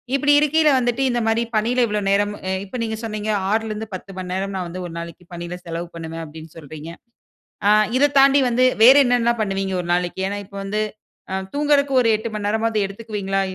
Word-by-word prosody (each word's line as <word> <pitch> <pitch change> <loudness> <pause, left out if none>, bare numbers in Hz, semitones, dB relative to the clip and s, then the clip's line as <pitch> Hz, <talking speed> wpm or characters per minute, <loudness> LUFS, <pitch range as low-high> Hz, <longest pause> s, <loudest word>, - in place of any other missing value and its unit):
இப்பிடி 290 +1 +3
இருக்கீல 305 +1 +3
வந்துட்டு, 245 +1 -1
இந்த 240 -1 0
மாரி 225 +1 +2
பணில 230 +4 +1
இவ்வளோ 210 0 -1
நேரம் 205 +1 +2
அ, - - -1 0.2
இப்ப 200 +6 -7
நீங்க 220 -1 -3
சொன்னீங்க 215 -1 -4 0.2
6ல 220 0 0
இருந்து 215 +1 -5
10 195 +1 -9
மணி 180 -1 -6
நேரம் 195 +1 -3
நான் 180 -2 -3
வந்து 180 +1 -6
ஒரு 165 - -10
நாளைக்கு 170 +1 -9
பணில 175 +1 -6
செலவு 170 +1 -5
பண்ணுவேன் 165 0 -6
அப்டீன்னு 155 +1 -12
சொல்றீங்க. 155 +1 -9 0.8
அ, - - +6 0.3
இதத் 285 +1 +2
தாண்டி 275 +1 +6
வந்து 250 +2 +3 0.2
வேறு 265 +4 +9
என்னென்ன 240 -1 +2
பண்ணுவீங்க 195 -2 -2
ஒரு 175 - -8
நாளைக்கு? 180 +1 -1
ஏன்னா 205 +1 -3
இப்போ 200 0 -11
வந்து, 210 +2 -2 0.5
அ - - -1 0.2
தூங்குறதுக்கு 285 -2 +2
ஒரு 230 - +2
8 230 +2 -5
மணி 205 -1 -2
நேரமாவது 220 -1 0
எடுத்துக்குவீங்களா, 200 -2 -3
210 Hz, 200 wpm, -21 LUFS, 185-240 Hz, 0.8 s, வேறு